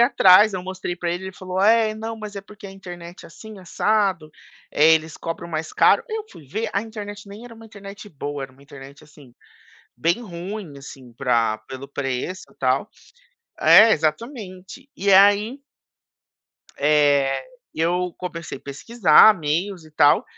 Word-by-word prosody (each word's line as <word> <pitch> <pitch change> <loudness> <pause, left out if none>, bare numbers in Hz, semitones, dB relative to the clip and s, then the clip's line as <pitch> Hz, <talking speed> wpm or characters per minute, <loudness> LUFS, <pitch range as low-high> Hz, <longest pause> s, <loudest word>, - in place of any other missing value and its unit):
atrás, 210 -4 +6
eu 180 - -4
mostrei 185 -1 -5
pra 175 0 -3
ele, 180 +2 -4
ele 190 - -7
falou: 185 0 -5
"É, 220 +1 +4
não, 225 +1 -6
mas 215 -2 -9
é - - -4
porque 205 +1 -13
a - - -10
internet 175 -2 -11
é - - -10
assim 215 +5 -13
assado, 190 -3 -1 0.4
eh, 160 +2 +5
eles 160 -1 -3
cobram 165 +1 -6
mais 160 -1 -5
caro". - - +4
Eu 440 -1 -4
fui 150 - -15
ver 215 +12 -4
a 200 - 0
internet, 210 -2 -9
nem 205 +4 -11
era 245 - -12
uma 225 0 -14
internet 200 -1 -11
boa, 145 -4 -6
era 135 - -14
uma 135 +2 -21
internet, 140 -1 -14
assim, 145 -5 -18 0.6
bem 170 +8 0
ruim, 180 -4 -8
assim, 135 -2 -12
pra 115 -3 0
pelo 135 +1 -8
preço 140 +6 -4
e - - -25
tal 130 +8 0 0.7
É, 225 - +7
exatamente, 195 - -4
e 200 +1 0
aí 205 +6 +4 1.2
Eh, 145 -2 +2 0.3
eu 175 +2 -1
comecei 170 -5 -7
pesquisar 170 - +4
meios 165 +4 -2
e 155 - -16
tal. 145 -1 +3
180 Hz, 160 wpm, -22 LUFS, 150-210 Hz, 1.2 s, É